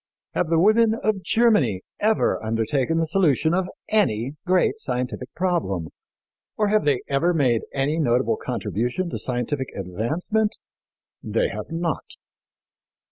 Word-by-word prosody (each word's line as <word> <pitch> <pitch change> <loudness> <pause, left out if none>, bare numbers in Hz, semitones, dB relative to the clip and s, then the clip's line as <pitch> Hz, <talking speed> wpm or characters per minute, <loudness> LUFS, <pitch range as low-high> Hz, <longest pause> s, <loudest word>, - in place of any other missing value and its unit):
Have 170 - 0
the 165 - +3
women 215 +5 +4
of 210 -2 -1
Germany 210 - +2 0.2
ever 215 - +1
undertaken 120 +8 0
the 165 - +2
solution 160 -3 +2
of 185 0 0 0.2
any 135 - +1
great 185 +4 +2
scientific 125 - -3
problem, 155 - -1 0.7
or 210 -1 +2
have 215 0 +2
they 140 -4 +2
ever 165 +6 +1
made 125 -7 +2
any 145 +4 0
notable 120 -4 +2
contribution 120 - -2
to - - -3
scientific 130 +2 -2
advancement? 150 - -1 0.6
They - - 0
have - - -6
not." 165 0 -3
155 Hz, 130 wpm, -23 LUFS, 120-185 Hz, 0.7 s, women